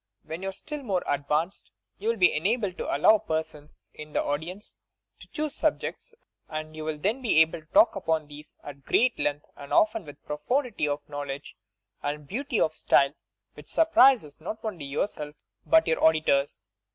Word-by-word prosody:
When 160 +3 -6
you 195 - -2
are - - -4
still 295 +9 -6
more 195 -8 -1
advanced, 150 +5 -1 0.3
you 215 +3 -1
will 230 - +1
be 180 -3 +5
enabled 200 +4 0
to - - -3
allow 215 +9 +6
persons 160 -3 -5
in 150 0 -10
the - - +1
audience 165 +8 -5 0.4
to - - -14
choose 305 -1 -3
sub - - +1
jects, 480 - -7 0.3
and 155 0 -5
you 155 - -6
will 155 -1 -2
then 210 - -1
be 230 -10 +1
able 160 +1 +4
to 155 - -28
talk 315 - +5
upon 160 -5 -1
these 150 +1 -13
at 140 -1 -10
great 245 - +2
length 145 0 -1
and 140 - -11
often 215 0 +3
with 145 -3 -11
a - - -47
profundity 215 - -1
of 145 0 -3
knowledge 145 -1 -6 0.5
and 145 0 -4
beauty 245 - -2
of 155 - +2
style 140 -2 +3 0.4
which - - -13
surprises 260 - +4
not 220 +7 -6
only 180 -9 -4
yourself 150 +1 -3 0.3
but 320 0 +5
your 160 - 0
auditors. 155 -3 +2
160 Hz, 185 wpm, -27 LUFS, 150-220 Hz, 0.5 s, allow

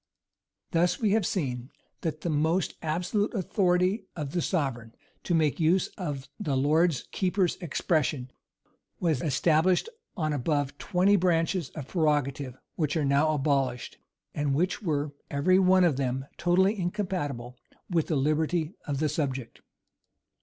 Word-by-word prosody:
Thus 170 +1 +2
we 215 -4 +2
have 210 -3 +2
seen, 125 -8 -2 0.3
that 155 -2 -3
the 170 - -2
"most 160 +5 +1
absolute" 180 +8 -1
authority 190 0 +1
of 150 -4 -4
the 175 - 0
sovereign, 135 - -2 0.3
to 175 - 0
make 155 -2 +2
use 170 +4 +3
of 145 -8 -5
the 140 -4 -1
lord 155 +2 +3
keeper's 185 -1 +1
expression 150 -6 -1 0.7
was 160 -7 +1
established 165 - +2 0.3
on 155 -3 0
above 145 0 -1
twenty 195 +2 +3
branches 170 -2 +1
of 145 -5 -6
prerogative, 145 -5 0 0.2
which 155 -1 -1
are 150 - +1
now 140 +3 +3
abolished, 135 -4 -1 0.3
and 145 -2 0
which 180 +5 0
were, 150 -6 -1 0.2
every 185 +7 +3
one 185 0 +5
of 160 -7 +3
them 130 0 -1
totally 190 +4 +2
incompatible 175 - -3 0.3
with 170 -4 0
the 160 - 0
liberty 155 +4 +1
of 145 -2 -1
the 155 +2 +1
subject. 135 -5 -3
155 Hz, 140 wpm, -28 LUFS, 140-180 Hz, 0.7 s, one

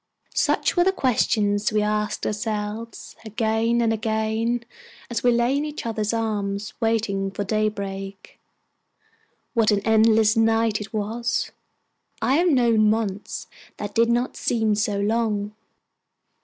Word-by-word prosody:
Such - - +1
were 350 - +4
the 380 - +3
questions 215 - +1
we 210 0 +1
asked 210 0 -1
ourselves 210 +1 -4
again 225 +1 0
and 225 -1 +2
again, 220 +2 -1 0.5
as 235 - -1
we 245 - +5
lay 240 +3 +2
in 285 - 0
each 300 -3 -6
other's 220 -2 -1
arms 205 -3 -2
waiting 220 -4 0
for 200 +1 -4
daybreak. 200 -2 -3 1.1
What 230 -3 +3
an 205 -2 +2
endless 220 0 +4
night 225 -1 +2
it 210 - -8
was! 230 +3 -2 0.7
I 270 - +2
have 350 +2 +3
known 230 -6 +4
months 210 -2 -2 0.3
that 205 0 -5
did 230 +2 +3
not 240 +2 0
seem 220 -3 +1
so 205 -1 0
long. 210 -1 0
220 Hz, 130 wpm, -23 LUFS, 210-230 Hz, 1.1 s, we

